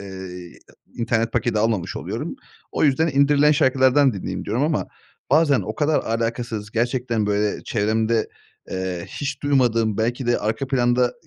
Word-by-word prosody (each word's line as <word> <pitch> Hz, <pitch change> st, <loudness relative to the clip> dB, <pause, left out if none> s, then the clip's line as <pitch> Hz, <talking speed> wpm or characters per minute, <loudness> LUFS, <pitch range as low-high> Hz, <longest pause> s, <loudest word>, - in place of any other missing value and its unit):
Eee, 95 Hz, -3 st, -8 dB, 0.2 s
a -, -, -20 dB, 0.2 s
internet 115 Hz, -1 st, 0 dB
paketi 120 Hz, -2 st, 0 dB
almamış 110 Hz, -5 st, 0 dB
oluyorum. -, -, -5 dB, 0.4 s
O -, -, +1 dB
yüzden 150 Hz, +4 st, +3 dB
indirilen 145 Hz, +1 st, +4 dB
şarkılardan 130 Hz, -1 st, +4 dB
dinleyeyim, 95 Hz, -, -5 dB
diyorum 115 Hz, +6 st, -1 dB
ama 150 Hz, 0 st, 0 dB, 0.4 s
bazen 145 Hz, -2 st, +4 dB
o -, -, -5 dB
kadar 150 Hz, 0 st, +2 dB
alakasız 115 Hz, -1 st, -3 dB
gerçekten 120 Hz, -2 st, -1 dB
böyle 105 Hz, 0 st, 0 dB
çevremde, 110 Hz, +1 st, 0 dB, 0.4 s
eee, 95 Hz, -2 st, -3 dB
hiç 145 Hz, 0 st, -5 dB
duymadığım 115 Hz, -6 st, +2 dB
belki 120 Hz, +3 st, -1 dB
de 120 Hz, -, +2 dB
arka 110 Hz, +6 st, -2 dB
planda 125 Hz, -2 st, +2 dB
120 Hz, 145 wpm, -22 LUFS, 110-135 Hz, 0.4 s, indirilen